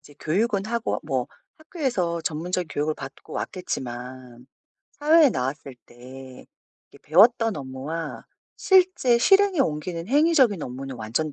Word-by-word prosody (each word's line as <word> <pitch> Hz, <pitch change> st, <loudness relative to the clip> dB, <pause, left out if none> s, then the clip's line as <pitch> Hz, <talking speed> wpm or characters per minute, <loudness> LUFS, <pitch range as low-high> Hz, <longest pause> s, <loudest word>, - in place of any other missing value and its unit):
이제 145 Hz, -1 st, -18 dB
교육은 200 Hz, +5 st, 0 dB
하고 235 Hz, 0 st, -2 dB
뭐 -, -, -2 dB, 0.3 s
학교에서 255 Hz, -, -2 dB
전문적인 170 Hz, +3 st, -3 dB
교육을 150 Hz, +1 st, -2 dB
받고 135 Hz, -2 st, -11 dB
왔겠지만 125 Hz, -6 st, -6 dB, 0.5 s
사회에 305 Hz, 0 st, +4 dB
나왔을 135 Hz, -, -4 dB
때 130 Hz, +1 st, -13 dB, 0.4 s
이게 -, -, -19 dB
배웠던 225 Hz, +6 st, +4 dB
업무와 140 Hz, +4 st, -6 dB, 0.3 s
실제 365 Hz, -11 st, +3 dB
실행에 390 Hz, +4 st, +4 dB
옮기는 165 Hz, -, -2 dB
행위적인 275 Hz, -, +3 dB
업무는 130 Hz, +1 st, -7 dB
완전 120 Hz, +8 st, -3 dB
165 Hz, 300 characters per minute, -24 LUFS, -, 0.5 s, 사회에